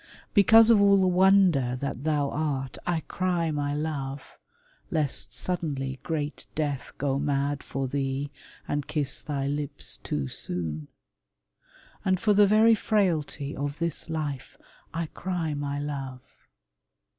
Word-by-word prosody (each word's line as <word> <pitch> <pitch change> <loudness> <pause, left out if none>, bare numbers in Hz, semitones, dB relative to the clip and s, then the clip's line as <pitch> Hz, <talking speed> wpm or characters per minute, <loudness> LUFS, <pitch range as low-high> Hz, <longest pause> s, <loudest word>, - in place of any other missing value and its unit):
Because 225 +3 +7
of 215 -3 +6
all 200 0 +6
the 190 - +3
wonder 180 -9 +4
that 135 0 -4
thou 145 -3 +1
art 140 -4 -2
I 170 -2 +1
cry 175 -2 -1
my 145 -1 -1
love, 145 -3 -3 0.7
lest 150 -4 -1
suddenly 140 -7 -3
great 150 -3 -3
Death 145 -4 -2
Go 140 -1 0
mad 140 0 0
for 135 0 -3
thee, 135 +1 -2 0.4
and 145 -1 -2
kiss 145 -3 -1
thy 140 -2 -2
lips 145 0 -3
too 70 -2 -3
soon. 80 0 -4 1.2
And 185 -1 +2
for 210 0 +3
the 205 0 +6
very 220 +3 +6
frailty 170 -10 0
of 145 +1 -3
this 170 -1 -3
life 145 -5 -4 0.3
I 165 0 -2
cry 170 -1 -3
my 145 0 -3
love. 135 -3 -5
145 Hz, 135 wpm, -27 LUFS, 140-175 Hz, 1.2 s, Because